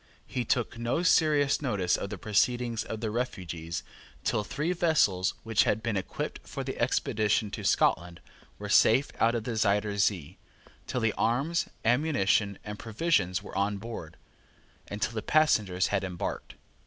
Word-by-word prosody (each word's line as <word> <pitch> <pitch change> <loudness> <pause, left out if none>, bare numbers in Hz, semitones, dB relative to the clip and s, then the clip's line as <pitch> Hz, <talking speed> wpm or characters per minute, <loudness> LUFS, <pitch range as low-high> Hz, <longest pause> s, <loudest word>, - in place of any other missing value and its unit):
He 125 - -3
took 120 -1 -1
no 120 +9 0
serious 150 -6 +3
notice 100 -10 +1
of 100 - -4
the - - -5
proceedings 115 +2 +1
of 110 0 -6
the 110 -2 -2
refugees 90 -8 -4 0.4
till 110 -1 0
three 150 +10 -2
vessels 145 - +2
which 115 -1 +3
had 110 - 0
been 115 -3 -1
equipped 95 - -4
for - - -6
the - - -4
expedition 105 -1 +1
to - - -6
Scotland 85 -1 +1 0.4
were 105 - -6
safe 115 +6 +4
out 115 +1 +3
of 115 - -2
the 115 0 -3
Zuyder 105 -1 +1
Zee, 95 -4 0 0.5
till 125 - -2
the 115 -1 +1
arms, 140 +9 0 0.2
ammunition, 110 -6 +2
and 105 0 -7
provisions 110 - 0
were - - -10
on 100 +1 0
board, 100 -7 -8 0.7
and 105 - -6
till - - -1
the 110 - -3
passengers 105 -12 +2
had 100 -1 +1
embarked. 90 -2 -5
110 Hz, 160 wpm, -28 LUFS, 100-125 Hz, 0.7 s, safe